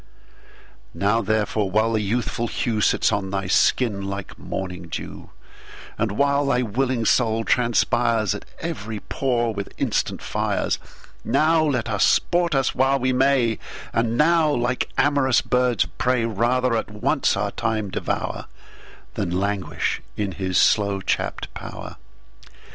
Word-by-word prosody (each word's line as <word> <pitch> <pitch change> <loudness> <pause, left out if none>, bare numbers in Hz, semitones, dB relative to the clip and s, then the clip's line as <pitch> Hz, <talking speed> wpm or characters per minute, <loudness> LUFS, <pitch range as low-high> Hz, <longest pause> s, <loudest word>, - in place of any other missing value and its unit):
Now 105 +3 +2
therefore, 105 -1 0
while 110 +3 +2
the 110 - +1
youthful 120 +3 -1
hewSits 110 -2 +1
on 100 -2 -1
thy 100 0 -2
skin 100 +1 +2
like 100 -1 -6
morning 90 -2 -5
[dew]And 105 +5 -7
while 140 +4 +2
thy 125 -2 +2
willing 125 +1 -1
Soul 115 -1 +2
transpiresAt 115 -3 +1 0.2
every 115 -10 -5
pore 120 -1 -1
with 100 -1 -5
instant - - -1
Fires, - - -1 0.4
Now 160 +1 +3
let 125 -7 0
us 105 -3 +1
sport 175 -3 +2
us 135 -1 +1
while 135 +2 +2
we 130 0 0
may; 130 -3 +2 0.3
And 115 0 0
now, 160 +1 +4
like 125 -2 0
am'rous 140 -4 +3
birds 125 -3 +2
of - - -13
prey, 125 -2 +2
Rather 120 +3 +1
at 110 - -2
once 105 0 0
our - - -1
Time 110 -3 -2
devour, - - -3 0.7
Than - - -2
languish 100 -1 -2 0.2
in 105 -2 -1
his 95 0 -2
slow 100 -2 +3
chapt - - -2
pow'r. - - -8
115 Hz, 130 wpm, -23 LUFS, 105-130 Hz, 0.7 s, now